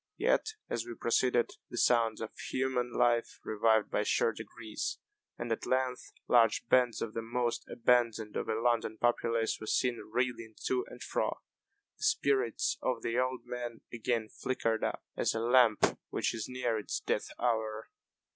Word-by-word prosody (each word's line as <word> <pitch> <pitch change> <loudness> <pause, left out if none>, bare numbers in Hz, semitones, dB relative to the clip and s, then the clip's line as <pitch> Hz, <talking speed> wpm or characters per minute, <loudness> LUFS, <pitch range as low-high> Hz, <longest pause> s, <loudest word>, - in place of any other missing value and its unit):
Yet, 440 0 +1
as 115 - -2
we 120 0 -7
proceeded, 120 +1 +2 0.2
the 120 - -7
sounds 115 -3 +3
of 110 - -4 0.2
human 130 -2 0
life 120 0 +1
revived 110 0 +2
by - - +1
sure - - +2
degrees, 110 -2 -5 0.4
and 120 0 -4
at 115 - -2
length 130 -1 0 0.2
large 115 -3 +4
bands 125 -2 +3
of 110 - -5
the 115 - -2
most 120 +1 -1
abandoned 115 -3 +2
of - - -2
a 110 0 0
London 115 -2 +1
populace 115 -1 +1
were 110 - -6
seen 125 -2 0
reeling 120 -2 -1
to 375 0 +1
and - - -9
fro. - - -1 0.6
The - - -9
spirits 140 - +1
of 125 -3 -1
the 115 +2 0
old 130 0 0
man 120 -2 -5
again 115 -1 -1
flickered 115 -3 -1
up, - - -2
as - - +1
a - - 0
lamp 120 -1 +5 0.2
which - - 0
is 110 -2 -4
near 125 -3 -1
its 105 - -3
death - - -1
hour. 110 -2 -1
120 Hz, 165 wpm, -32 LUFS, 115-125 Hz, 0.6 s, lamp